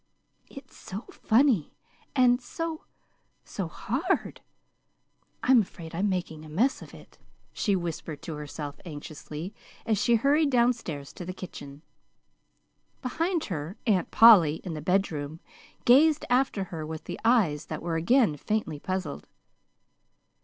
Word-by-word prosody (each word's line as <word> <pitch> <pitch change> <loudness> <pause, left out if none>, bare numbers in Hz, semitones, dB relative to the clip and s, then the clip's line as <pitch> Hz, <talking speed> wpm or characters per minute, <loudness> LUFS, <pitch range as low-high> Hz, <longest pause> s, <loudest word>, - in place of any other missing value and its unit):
"It's 275 - -13
so 195 +3 -7
funny 230 - +2 0.4
and 250 -1 +4
so 330 +4 -5 0.6
so 190 -4 -4
hard, 275 - -2 1.0
I'm 255 -2 +6
afraid 170 -4 -9
I'm 195 +5 0
making 175 -4 -3
a 155 - -11
mess 230 - +1
of - - -11
it," - - -16 0.3
she 205 -3 +1
whispered 165 -4 -5
to 165 - -5
herself 150 -1 -7
anxiously, 155 +2 -7 0.3
as 215 -3 +1
she 235 - +4
hurried 285 +6 +3
down 245 -1 +4
stairs 150 - -7
to - - -8
the 185 +1 -5
kitchen. 145 -6 -9 1.2
Behind 330 +6 -1
her, 165 +2 -5
Aunt 195 -7 +2
Polly, 195 -10 +7
in 180 - -5
the 155 - -5
bedroom, 160 -4 -1 0.5
gazed 295 +5 +5
after 250 -5 +2
her 160 -1 -4
with 155 0 -7 0.2
eyes 205 -11 +2
that 155 - -5
were 170 -1 -2
again 175 - +3
faintly 185 -4 -2
puzzled. 185 -3 -4
185 Hz, 130 wpm, -27 LUFS, 155-245 Hz, 1.2 s, Polly